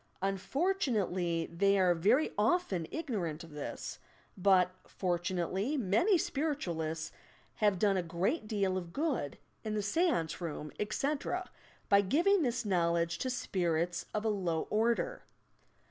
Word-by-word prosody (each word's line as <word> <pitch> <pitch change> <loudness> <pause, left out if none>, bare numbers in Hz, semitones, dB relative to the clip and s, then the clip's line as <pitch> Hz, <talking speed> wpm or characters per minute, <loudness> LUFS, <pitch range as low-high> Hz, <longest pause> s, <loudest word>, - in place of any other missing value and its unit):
Unfortu 275 - 0
nately, 175 -5 0
they 195 +4 +2
are 185 -2 +4
very 215 - +2
often 210 - +1
ignorant 190 - -3
of 165 - -12
this, 150 -1 -6 0.4
but 185 -1 +4 0.2
for 175 -2 -1
tunately 185 - -1
many 250 - +3
spiritualists 170 - -2 0.5
have 205 -3 +3
done 195 +1 +3
a - - +2
great 185 - -1
deal 195 -3 0
of 170 -2 -10
good 280 - -1 0.3
in 215 -1 -2
the 210 - -1
seance 205 - +1
room, 150 -3 -4
etc., 285 - -1 0.4
by 200 0 +6
giving 340 - +3
this 245 -4 0
knowledge 170 -3 +1
to 260 - -1
"spirits" 175 -7 -1
of 215 +1 -2
a - - +3
low 180 -6 0
order. 235 - +1
195 Hz, 135 wpm, -32 LUFS, 170-250 Hz, 0.5 s, by